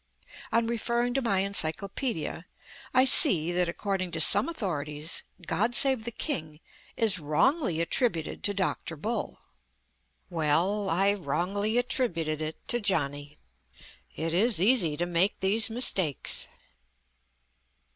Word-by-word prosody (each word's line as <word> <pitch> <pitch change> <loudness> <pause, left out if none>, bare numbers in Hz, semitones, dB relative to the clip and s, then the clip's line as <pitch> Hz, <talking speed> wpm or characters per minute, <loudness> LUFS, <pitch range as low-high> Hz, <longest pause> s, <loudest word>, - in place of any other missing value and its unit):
On 230 0 +1
referring 235 +1 -2
to 270 - -1
my 200 -6 0
encyclopedia, 200 - -3 0.4
I 255 0 +4
see 175 -9 +6
that, 175 0 -1
according 190 0 -3
to 165 - -3
some 200 - +5
authorities, 155 - -4 0.2
"God 215 +10 -1
Save 265 -5 +2
the 235 - -5
King" 160 - -5 0.4
is 210 -5 +5
"wrongly 165 - 0
attributed" 170 - -2
to 205 - +1
Dr. 185 -3 -3
Bull. 215 +8 -5 0.9
Well, 180 +5 0
I 195 +4 +2
wrongly 200 +6 -2
attributed 170 - -2
it 155 0 -7
to 240 - +2
Johnny. 145 -7 -2 0.8
It 165 0 -3
is 210 +3 +2
easy 185 -7 +3
to 175 - -2
make 175 +3 0
these 210 +4 +4
mistakes. 195 - +2
190 Hz, 120 wpm, -27 LUFS, 160-230 Hz, 0.9 s, see